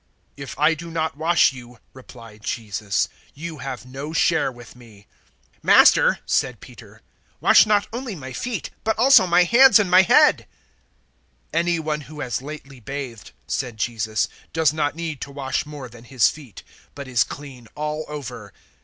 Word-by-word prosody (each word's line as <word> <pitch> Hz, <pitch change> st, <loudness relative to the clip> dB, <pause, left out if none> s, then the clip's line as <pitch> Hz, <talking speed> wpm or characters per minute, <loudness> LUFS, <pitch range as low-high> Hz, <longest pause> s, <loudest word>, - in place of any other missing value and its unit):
"If 140 Hz, -1 st, -9 dB
I 155 Hz, +2 st, +4 dB
do 170 Hz, +1 st, -8 dB
not 160 Hz, -2 st, -2 dB
wash 160 Hz, -1 st, +3 dB
you," 125 Hz, -2 st, -12 dB, 0.2 s
replied 115 Hz, -4 st, -14 dB
Jesus, 105 Hz, -2 st, -2 dB, 0.3 s
"you 160 Hz, 0 st, -7 dB
have 130 Hz, -1 st, -6 dB
no 135 Hz, +4 st, -7 dB
share 145 Hz, -, +2 dB
with 120 Hz, -1 st, -14 dB
me." 110 Hz, -5 st, -17 dB, 0.5 s
013:009 -, -, -38 dB
"Master," -, -, +5 dB
said -, -, 0 dB
Peter, -, -, -15 dB, 0.4 s
"wash -, -, +6 dB
not 210 Hz, -1 st, +2 dB
only 240 Hz, -3 st, -5 dB
my 130 Hz, -4 st, -9 dB
feet, 240 Hz, -, -4 dB
but 220 Hz, -, 0 dB
also 245 Hz, -5 st, +6 dB
my 175 Hz, +1 st, +5 dB
hands 235 Hz, +5 st, +7 dB
and 200 Hz, -4 st, 0 dB
my 185 Hz, +1 st, +8 dB
head." 190 Hz, -, +4 dB, 1.1 s
013:010 165 Hz, -, +2 dB
"Any 170 Hz, 0 st, +1 dB
one 155 Hz, -1 st, -3 dB
who 150 Hz, +1 st, -12 dB
has 125 Hz, -1 st, -3 dB
lately 140 Hz, -2 st, -10 dB
bathed," 125 Hz, -2 st, -7 dB, 0.2 s
said 125 Hz, -4 st, -4 dB
Jesus, 110 Hz, -2 st, -1 dB, 0.3 s
"does 160 Hz, -2 st, +2 dB
not 150 Hz, -2 st, -1 dB
need 160 Hz, -4 st, -5 dB
to -, -, -6 dB
wash 140 Hz, 0 st, -3 dB
more 145 Hz, -3 st, -8 dB
than 120 Hz, 0 st, -15 dB
his 130 Hz, -2 st, +3 dB
feet, 140 Hz, -8 st, -11 dB, 0.3 s
but 140 Hz, -1 st, -8 dB
is 125 Hz, -3 st, +2 dB
clean 135 Hz, -5 st, -11 dB
all 150 Hz, +1 st, -3 dB
over. 125 Hz, -8 st, -8 dB
145 Hz, 170 wpm, -22 LUFS, 125-165 Hz, 1.1 s, my